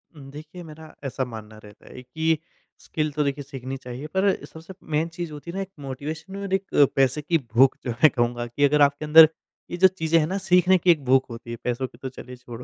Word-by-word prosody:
उम, 140 -2 -12
देखिए, 155 +4 -10
मेरा 155 -1 -13
ऐसा 135 -1 -3
मानना 110 -3 -10
रहता 105 0 -16
है 125 - -10
कि 160 +5 0 0.4
स्किल 155 -1 -3
तो 150 +1 -1
देखिए, 140 0 -2
सीखनी 135 -1 -7
चाहिए, 130 +2 -8
पर 190 +4 +1
सबसे 165 +4 -12 0.2
मेन 160 +2 +1
चीज़ 170 -1 -6
होती 150 +3 -8
है - - -10
ना, 195 - -2
एक 195 - -6
मोटिवेशन 150 +6 -7
और 200 -1 -5
एक 195 0 -2
अ, 145 - +7
पैसे 135 +2 +2
की 165 +3 +1 0.2
भूख, 130 +3 +5
जो 125 - -1
मैं 125 +7 +4
कहूँगा 120 0 -1
कि 120 +5 -2
अगर 150 +1 +2
आपके 145 +1 +3
अंदर 160 +1 +9 0.4
ये 175 - -4
जो 190 +1 +7
चीज़ें 165 -3 +1
हैं 155 - 0
ना, 190 +4 -2
सीखने 185 -1 +3
की 180 0 +4
एक 155 -4 0
भूख 130 +1 +3
होती 115 0 -9
है। 120 - -5
पैसों 125 +2 -2
की 120 - -20
तो 130 +1 -6
चलिए 125 0 -11
छोड़ो, 125 -1 -10
145 Hz, 240 wpm, -24 LUFS, 130-165 Hz, 0.4 s, अंदर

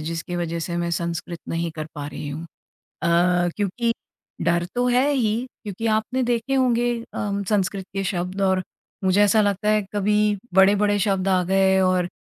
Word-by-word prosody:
जिसकी 165 +2 -4
वजह 170 -1 -2
से 170 +1 -3
मैं 170 0 -1
संस्कृत 170 0 -3
नहीं 165 0 -2
कर 155 -1 -4
पा 145 -1 -5
रही 145 0 -6
हूँ। 150 +3 -5 0.6
अ, - - +2 0.5
क्योंकि 230 +4 0 0.5
डर 170 +1 +1
तो 245 0 +1
है 250 +3 +3
ही 230 -6 +1 0.3
क्योंकि 210 +1 -5
आपने 220 +4 0
देखे 240 +2 0
होंगे 240 -2 +2 0.2
अ, - - -6 0.3
संस्कृत 195 -2 0
के 195 - -1
शब्द 185 0 -2
और 190 -1 +2 0.4
मुझे 190 +2 +3
ऐसा 205 +1 +5
लगता 205 0 0
है 215 0 +3
कभी 210 0 +2 0.2
बड़े-बड़े 205 +2 +4
शब्द 195 -1 0
आ 185 -1 +3
गए 190 +1 +3
और 185 -1 +2
195 Hz, 170 wpm, -23 LUFS, 175-215 Hz, 0.6 s, ऐसा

